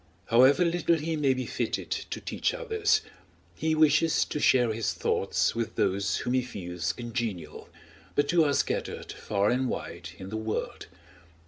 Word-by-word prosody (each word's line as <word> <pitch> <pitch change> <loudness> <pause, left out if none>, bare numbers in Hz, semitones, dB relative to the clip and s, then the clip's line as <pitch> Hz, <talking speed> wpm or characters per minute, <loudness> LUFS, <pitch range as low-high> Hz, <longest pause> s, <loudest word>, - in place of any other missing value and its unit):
However 130 +9 +6
little 170 0 +2
he 160 +1 -2
may 140 -4 +2
be 130 0 -3
fitted - - -3
to - - -3
teach - - -2
others, 445 -4 +1 0.5
he 160 0 0
wishes 155 +1 +4
to 150 - -4
share 125 -5 +4
his 115 0 -1
thoughts - - 0
with 115 -1 -3
those 100 0 +1
whom 125 - -2
he 130 - +3
feels 90 -8 -4
congenial, 115 -10 -5 0.5
but 145 +1 +2
who 170 -2 +5
are 145 -2 +2
scattered - - -2
far 100 0 0
and 130 +1 0
wide 85 0 -5
in 95 0 -8
the 110 - -4
world. 110 0 -4
125 Hz, 160 wpm, -28 LUFS, 110-155 Hz, 0.5 s, However